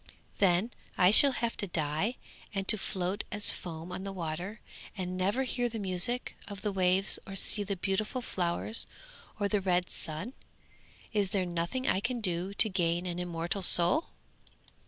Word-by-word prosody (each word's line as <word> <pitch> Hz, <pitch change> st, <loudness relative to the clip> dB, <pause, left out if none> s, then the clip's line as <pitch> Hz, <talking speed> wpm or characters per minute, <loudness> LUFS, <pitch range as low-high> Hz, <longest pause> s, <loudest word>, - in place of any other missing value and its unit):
'Then 190 Hz, +4 st, +2 dB, 0.3 s
I 180 Hz, +1 st, +5 dB
shall 275 Hz, +6 st, +9 dB
have 235 Hz, -1 st, -2 dB
to 205 Hz, -, -2 dB
die 160 Hz, +7 st, -1 dB, 0.4 s
and 195 Hz, 0 st, -2 dB
to 215 Hz, -, +7 dB
float 190 Hz, -1 st, -3 dB
as 205 Hz, 0 st, +4 dB
foam 165 Hz, 0 st, -7 dB
on 180 Hz, +1 st, -6 dB
the 195 Hz, -, -5 dB
water, 180 Hz, +4 st, -5 dB, 0.4 s
and 185 Hz, -1 st, -4 dB
never 200 Hz, +8 st, 0 dB
hear 245 Hz, -1 st, 0 dB
the 225 Hz, -, -6 dB
music 200 Hz, +5 st, -2 dB
of 205 Hz, -1 st, -9 dB
the 210 Hz, -, -1 dB
waves 190 Hz, +1 st, +3 dB
or 195 Hz, -, -7 dB
see 205 Hz, +2 st, +3 dB
the 200 Hz, 0 st, -3 dB
beautiful 195 Hz, +7 st, -2 dB
flowers 180 Hz, +4 st, -1 dB, 0.5 s
or 205 Hz, -, +1 dB
the 205 Hz, 0 st, 0 dB
red 180 Hz, -2 st, 0 dB
sun! 160 Hz, +11 st, -5 dB, 0.8 s
Is 205 Hz, -3 st, +1 dB
there 195 Hz, -2 st, -1 dB
nothing 175 Hz, +10 st, -3 dB
I -, -, +2 dB
can 245 Hz, +4 st, -2 dB
do 180 Hz, -2 st, 0 dB
to 220 Hz, -, +7 dB
gain 175 Hz, -3 st, 0 dB
an 175 Hz, -1 st, -4 dB
immortal 175 Hz, +2 st, -3 dB
soul?' 175 Hz, -, +4 dB
190 Hz, 170 wpm, -30 LUFS, 175-210 Hz, 0.8 s, shall